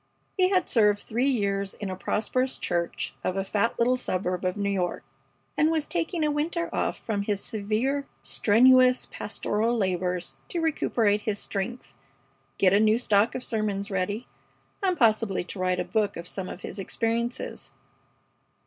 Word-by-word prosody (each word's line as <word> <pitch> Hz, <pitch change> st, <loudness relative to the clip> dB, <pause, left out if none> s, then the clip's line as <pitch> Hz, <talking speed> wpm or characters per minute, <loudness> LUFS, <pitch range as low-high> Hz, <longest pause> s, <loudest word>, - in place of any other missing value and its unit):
He 370 Hz, -1 st, +3 dB
had 370 Hz, -3 st, +2 dB
served 210 Hz, -3 st, +4 dB
three 240 Hz, +6 st, 0 dB
years 200 Hz, -5 st, 0 dB
in 200 Hz, -3 st, -5 dB
a -, -, -3 dB
prosperous 255 Hz, +7 st, -1 dB
church 170 Hz, -1 st, -2 dB
of 185 Hz, -, -1 dB
a 195 Hz, -, +1 dB
fat 210 Hz, +4 st, 0 dB
little 245 Hz, +2 st, +3 dB
suburb 185 Hz, -6 st, -2 dB
of 185 Hz, +2 st, 0 dB
New 200 Hz, -1 st, 0 dB
York, 180 Hz, -3 st, -1 dB, 0.5 s
and 305 Hz, -, +3 dB
was 315 Hz, -2 st, 0 dB
taking 340 Hz, -1 st, -1 dB
a 300 Hz, -, +2 dB
winter 335 Hz, +3 st, -2 dB
off -, -, 0 dB
from 210 Hz, -3 st, -2 dB
his 200 Hz, -1 st, -1 dB
severe, 230 Hz, +6 st, -1 dB, 0.2 s
strenuous 255 Hz, +3 st, +5 dB
pastoral 220 Hz, +3 st, -1 dB
labors 180 Hz, -3 st, -1 dB
to 345 Hz, -, -3 dB
recuperate 230 Hz, -10 st, +1 dB
his 210 Hz, -1 st, -1 dB
strength, 200 Hz, -, -5 dB, 0.6 s
get 185 Hz, -1 st, +4 dB
a 200 Hz, -, +5 dB
new 215 Hz, +1 st, +4 dB
stock 215 Hz, -2 st, +2 dB
of 255 Hz, -, -3 dB
sermons 210 Hz, -2 st, -2 dB
ready, 200 Hz, +5 st, -2 dB, 0.5 s
and 370 Hz, -3 st, +1 dB
possibly 215 Hz, -5 st, +2 dB
to 180 Hz, +2 st, -8 dB
write 185 Hz, 0 st, +1 dB
a -, -, -1 dB
book 215 Hz, -2 st, 0 dB
of 170 Hz, +1 st, -6 dB
some 190 Hz, 0 st, -4 dB
of 185 Hz, -, -8 dB
his 200 Hz, -, -7 dB
experiences. 230 Hz, -, -2 dB
215 Hz, 165 wpm, -27 LUFS, 195-255 Hz, 0.6 s, strenuous